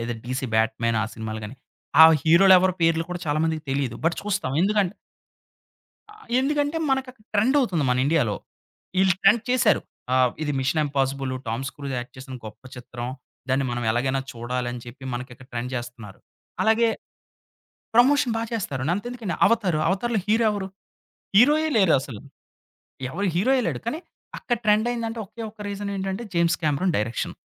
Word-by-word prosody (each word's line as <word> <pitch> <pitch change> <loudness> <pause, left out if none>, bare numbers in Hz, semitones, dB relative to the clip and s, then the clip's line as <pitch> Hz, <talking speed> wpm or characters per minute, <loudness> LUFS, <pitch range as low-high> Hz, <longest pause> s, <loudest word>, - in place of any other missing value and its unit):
లేదా 120 +1 -3
'DC 130 +2 -3
bat 110 0 +2
man' 115 -1 +2
ఆ! - - 0
సినిమాలు 110 0 -5
గాని, 120 +6 -8 0.5
ఆ - - +12 0.2
హీరోలెవరి 185 +2 +6
పేర్లు 165 0 +3
కూడా 175 -1 -4
చాలా 150 0 +1
మందికి 160 -1 -1
తెలీదు. 135 -4 -1
బట్ 165 0 +2
చూస్తాం 200 -10 -2
ఎందుకంటే 205 -1 +1 1.2
ఆ! - - -16 0.3
ఎందుకంటే 290 +2 0
మనక 265 -1 0 0.3
ట్రెండవుతుంది 220 - +2
మన 125 - +2
ఇండియాలో. 145 -10 +2 0.7
ఈళ్ళు 190 -1 +4
ట్రెండ్ 210 +3 +5
చేసారు. 245 -4 +3 0.3
ఆహ్, 130 -1 +4
ఇది 145 -1 -1
'మిషన్ 140 +4 +1
ఇంపాజిబులు', 135 -1 -1
టామ్స్ 125 +4 -3
క్రూజ్ 140 -2 -5
యాక్ట్ 120 - -8
చేసిన 130 0 -9
గొప్ప 110 +4 -11
చిత్రం, 120 0 -6 0.4
దాన్ని 135 +1 +1
మనం 120 0 -3
ఎలాగైనా 130 +4 0
చూడాలని 120 +1 -4
చెప్పి, 130 +3 -11
మనకిక్కడ 125 0 -8
ట్రెండ్ 120 +1 -3
జేస్తన్నారు. 120 -4 -7 0.4
అలాగే 225 +1 +3 1.1
ప్రమోషన్ 255 -1 +4
బా - - -1
చేస్తారు. 140 - -3
అంతెందుకండి 210 0 -3
అవతారు, 195 -9 +1
అవతార్‌లో 220 +3 0
హీరో 225 +2 +3
ఎవరు? 200 -2 -3 0.7
హీరోయే 300 +7 +5
లేరసలు. 140 - +2 0.9
ఎవరు 195 +7 -2
హీరోయే 255 +8 +3
లేడు. - - -2
కానీ, 300 +8 -2 0.4
అక్కడ 240 -2 -1
ట్రెండయిందంటే, 225 +2 +1
ఒకే 220 +4 -11
ఒక్క 215 - -22
రీజనేంటంటే, 200 +1 -4
'జేమ్స్ 170 0 +2
కామెరాన్' 155 +4 +1
డైరెక్షన్. 110 +2 -2
165 Hz, 145 wpm, -24 LUFS, 125-215 Hz, 1.2 s, ఆ